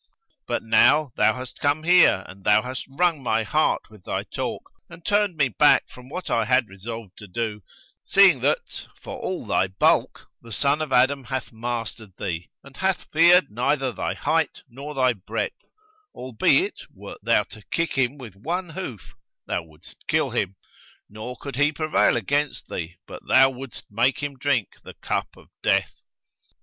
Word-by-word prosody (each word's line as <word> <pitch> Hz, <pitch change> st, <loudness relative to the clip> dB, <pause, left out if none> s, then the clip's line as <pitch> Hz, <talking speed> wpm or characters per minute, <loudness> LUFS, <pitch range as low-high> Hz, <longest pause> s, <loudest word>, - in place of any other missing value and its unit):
But -, -, -1 dB
now 125 Hz, +6 st, +4 dB
thou -, -, +3 dB
hast 130 Hz, 0 st, -8 dB
come 145 Hz, +2 st, +1 dB
here 175 Hz, -, +5 dB
and 95 Hz, +1 st, -13 dB
thou 105 Hz, -, +4 dB
hast 130 Hz, +1 st, -6 dB
wrung 165 Hz, +1 st, +1 dB
my 115 Hz, -3 st, +1 dB
heart 155 Hz, +9 st, +1 dB
with 105 Hz, -4 st, -16 dB
thy -, -, -3 dB
talk -, -, -4 dB, 0.3 s
and 165 Hz, 0 st, -14 dB
turned 205 Hz, -4 st, +2 dB
me 140 Hz, -3 st, +3 dB
back 110 Hz, -, +4 dB
from 125 Hz, 0 st, -14 dB
what 180 Hz, +5 st, -6 dB
I 115 Hz, -, +1 dB
had 125 Hz, 0 st, +3 dB
resolved 100 Hz, 0 st, -8 dB
to 105 Hz, -, -10 dB
do, 105 Hz, +1 st, -3 dB, 0.4 s
seeing 195 Hz, -1 st, +6 dB
that, -, -, -1 dB
for -, -, -8 dB
all 185 Hz, -, -4 dB
thy 95 Hz, -, +1 dB
bulk, 95 Hz, +1 st, +1 dB, 0.2 s
the 115 Hz, -, -13 dB
son 140 Hz, +7 st, +1 dB
of 155 Hz, -3 st, -3 dB
Adam 130 Hz, +1 st, +3 dB
hath 130 Hz, 0 st, -4 dB
mastered 115 Hz, -3 st, -5 dB
thee 85 Hz, -1 st, -4 dB
and 140 Hz, -1 st, -15 dB
hath 190 Hz, -1 st, -1 dB
feared 170 Hz, -, +6 dB
neither 130 Hz, +3 st, 0 dB
thy -, -, -3 dB
height -, -, 0 dB
nor 140 Hz, +5 st, -8 dB
thy 130 Hz, -2 st, +3 dB
breadth, 100 Hz, -3 st, -5 dB, 0.5 s
albeit, 125 Hz, -4 st, +1 dB
wert -, -, -11 dB
thou -, -, +3 dB
to 110 Hz, -, -14 dB
kick 165 Hz, 0 st, -1 dB
him 135 Hz, +1 st, 0 dB
with 120 Hz, -8 st, -10 dB
one 170 Hz, -, -3 dB
hoof 155 Hz, -, -7 dB, 0.3 s
thou -, -, -2 dB
wouldst 80 Hz, 0 st, -18 dB
kill -, -, +1 dB
him, 95 Hz, -, -1 dB, 0.6 s
nor 110 Hz, +4 st, -7 dB
could 140 Hz, -3 st, -7 dB
he 145 Hz, +1 st, +3 dB
prevail 155 Hz, -4 st, +2 dB
against 145 Hz, +6 st, -1 dB
thee, 85 Hz, 0 st, -5 dB
but -, -, -10 dB
thou 135 Hz, +1 st, +6 dB
wouldst 130 Hz, -1 st, -8 dB
make 125 Hz, +7 st, +1 dB
him 145 Hz, -1 st, -3 dB
drink 130 Hz, -6 st, 0 dB
the -, -, -11 dB
cup -, -, -2 dB
of -, -, -18 dB
death.' -, -, +1 dB
130 Hz, 175 wpm, -24 LUFS, 110-150 Hz, 0.6 s, seeing